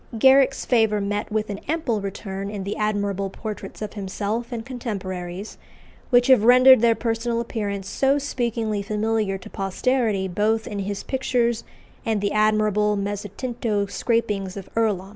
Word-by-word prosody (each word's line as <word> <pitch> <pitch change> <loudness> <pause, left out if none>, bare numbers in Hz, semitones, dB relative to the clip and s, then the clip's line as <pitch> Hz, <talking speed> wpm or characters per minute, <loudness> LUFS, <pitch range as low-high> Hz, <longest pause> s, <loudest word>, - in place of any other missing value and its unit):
Garrick's 270 +3 +5
favour 220 -4 +3
met 205 +1 -2
with 215 -1 -1
an 200 - -5
ample 280 -9 0
return 195 0 -5
in 205 -2 -5
the 200 - -3
admirable 200 -2 -1
portraits 215 +1 -7
of 210 - -5
himself 210 +4 -3
and 230 -2 -4
contemporaries, 195 -6 -5 0.5
which 245 -1 +5
have 255 -5 +5
rendered 255 +1 +8
their 230 -1 +4
personal 230 +1 -1
appearance 205 -4 -3
so 270 +7 +2
speakingly 235 -6 -2
familiar 215 -1 -1
to 185 - -12
posterity 200 0 0
both 215 +4 0
in 205 - -5
his 200 0 -3
pictures 245 -3 0 0.4
and 220 -2 0
the 200 0 -1
admirable 215 -1 +2
mezzotinto 205 +2 -2
scrapings 205 -3 -1
of 195 - -9
Earlom. 205 -4 0
215 Hz, 145 wpm, -23 LUFS, 200-235 Hz, 0.5 s, rendered